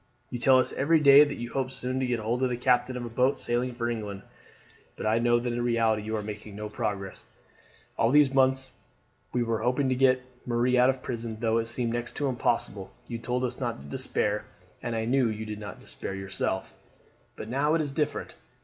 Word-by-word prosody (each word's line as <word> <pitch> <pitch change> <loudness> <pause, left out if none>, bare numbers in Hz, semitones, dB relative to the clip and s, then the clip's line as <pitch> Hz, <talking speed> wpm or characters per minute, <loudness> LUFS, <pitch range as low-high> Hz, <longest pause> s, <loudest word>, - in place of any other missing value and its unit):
You 120 - -3
tell 130 +2 +6
us 130 - +1
every 160 +4 +3
day 140 0 +9
that 145 -1 -2
you 120 0 -6
hope 135 -1 -1
soon 130 0 -3
to 130 - 0
get 120 -2 0
hold 115 +3 -1
of 130 - +2
the 120 - -2
captain 125 0 +2
of 120 - -4
a - - -5
boat 125 +4 +2
sailing 120 +1 -1
for 120 -1 -2
England; 105 -4 -4 0.7
but - - -6
I 110 +1 +3
know 120 0 +3
that 120 0 -2
in 120 - -1
reality 115 -2 +2
you 110 +1 -3
are 105 - -4
making 105 0 -7
no 105 +1 -5
progress. 105 -4 -4 0.7
All 115 - +3
those 145 -1 +5
months 130 0 +2 0.6
when 125 - 0
we - - -5
were 115 -1 0
hoping 130 +3 +1
to 130 - +2
get 130 0 +3 0.2
Marie 120 +1 +1
out 125 +1 +5
of 130 -1 -1
prison 115 -2 -4
though 115 0 +2
it 115 - -2
seemed 115 0 -1
next 120 0 -3
to 145 - -1
impossible 115 -6 -1 0.2
you 115 -1 -5
told 125 +2 -2
us 125 -1 -2
not 120 -3 -2
to 70 - -12
despair, 105 +8 -1 0.4
and 120 -1 -3
I 110 0 -1
knew 125 0 +2
you 110 0 -4
did 105 -1 -6
not 105 -1 -8
despair 95 - -6
yourself; 95 0 -3 0.6
but - - -7
now 140 +6 +1
it 165 - +2
is 145 -2 -2
different. 150 +1 -2
120 Hz, 225 wpm, -28 LUFS, 110-130 Hz, 0.7 s, day